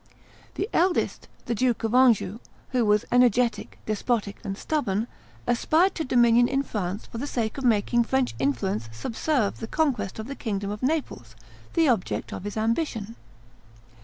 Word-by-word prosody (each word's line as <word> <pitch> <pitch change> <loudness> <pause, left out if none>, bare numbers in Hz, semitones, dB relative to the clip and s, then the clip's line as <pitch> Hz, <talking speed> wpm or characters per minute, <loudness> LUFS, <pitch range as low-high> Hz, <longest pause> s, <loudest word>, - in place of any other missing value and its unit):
The 400 - -1
eldest, 355 +2 +1 0.2
the 235 - -1
Duke 245 0 0
of 225 0 -1
Anjou, 235 -5 +4 0.3
who 250 -2 +1
was 210 0 +3
energetic, 245 -1 +2
despotic, 215 -1 -1
and 195 0 -4
stubborn, 220 -9 -1 0.4
aspired 315 +10 +3
to 325 - -3
dominion 240 -2 +4
in 275 +2 0
France 205 -4 -4
for 230 - -8
the 280 - -3
sake 230 -1 -2
of - - -6
making 235 0 +3
French 130 - +1
influence 115 -5 -1
subserve 225 - -1
the 225 - -5
conquest 280 -8 0
of 220 - -5
the 275 - -5
kingdom 200 -6 -3
of 210 - -6
Naples, 255 - -2 0.4
the 330 -2 +4
object 230 -8 0
of 190 - -6
his 205 +1 -5
ambition. 225 -1 -1
230 Hz, 160 wpm, -26 LUFS, 205-255 Hz, 0.4 s, Anjou